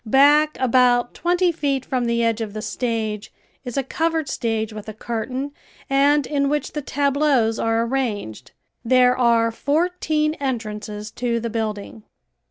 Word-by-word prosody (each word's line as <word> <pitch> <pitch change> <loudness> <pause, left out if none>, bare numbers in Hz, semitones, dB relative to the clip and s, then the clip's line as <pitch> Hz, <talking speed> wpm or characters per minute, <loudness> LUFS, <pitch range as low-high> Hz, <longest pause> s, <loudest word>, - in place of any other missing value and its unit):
Back 290 +6 +4
about 245 -1 +3
twenty 355 +1 +1
feet 280 -5 -1
from 250 -2 -1
the 235 0 +1
edge 230 0 0
of 215 -2 -4
the 215 - -5
stage 220 -4 -3 0.3
is 245 -1 -6
a 275 - +1
covered 320 +2 -1
stage 225 -4 -2
with 215 0 -8
a 215 - -8
curtain 250 +5 -4 0.4
and 285 +1 +4
in 280 -1 0
which 295 0 -1
the 295 - -4
tableaus 280 -5 +1
are 225 0 +1
arranged. 220 - -3 0.3
There 250 +1 +4
are 235 -2 +3
fourteen 305 +3 0
entrances 215 -5 -4
to 235 -1 -1
the 230 0 -4
building. 215 -1 -4
250 Hz, 150 wpm, -22 LUFS, 225-285 Hz, 0.4 s, Back